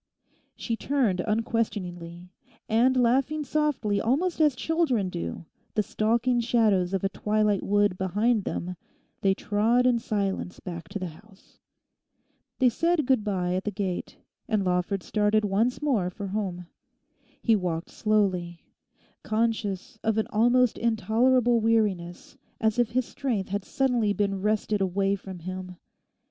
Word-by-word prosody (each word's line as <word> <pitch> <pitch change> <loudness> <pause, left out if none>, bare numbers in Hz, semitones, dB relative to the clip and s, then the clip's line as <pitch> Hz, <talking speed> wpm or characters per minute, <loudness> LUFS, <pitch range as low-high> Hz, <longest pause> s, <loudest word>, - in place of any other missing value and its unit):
She 230 - -3
turned 235 -8 0
unquestioningly. 180 -5 -2 0.4
And 245 +4 +3
laughing 270 +5 +2
softly 265 -9 0
almost 315 +9 0
as 300 -4 +4
children 260 - 0
do, 85 - -5 0.3
the 210 - +2
stalking 235 +4 +1
shadows 215 -6 +2
of 190 - -2
a 195 - +2
twilight 210 0 +1
wood 205 -2 +1
behind 205 +4 +1
them—they 180 +2 -4
trod 225 +6 +2
in 245 -2 +3
silence 200 -4 -2
back 170 -3 -7
to - - -4
the 185 - -4
house. 195 +5 -19 1.0
They 260 - +4
said 330 +5 +1
good 255 -4 +2
bye 185 -4 -1
at 185 +1 -1
the 210 - -1
gate, 190 -3 -4 0.3
and 215 -5 +1
Lawford 180 +1 0
started 210 0 +1
once 225 +8 0
more 225 -12 +1
for 200 +3 -7
home. 185 -3 -3 0.7
He 230 -4 +3
walked 175 -4 -3
slowly, 185 -5 0 0.6
conscious 220 -2 -2
of 220 -1 0
an 220 - +2
almost 240 +2 +3
intolerable 235 +2 +2
weariness, 210 -6 0 0.2
as 220 +1 +1
if 240 -2 +3
his 255 -1 +1
strength 240 -10 -3
had 200 0 -2
suddenly 245 -6 +1
been 200 -2 -1
wrested 210 0 0
away 195 +1 +1
from 190 -1 -9
him. 185 +1 -7
210 Hz, 135 wpm, -26 LUFS, 190-235 Hz, 1.0 s, as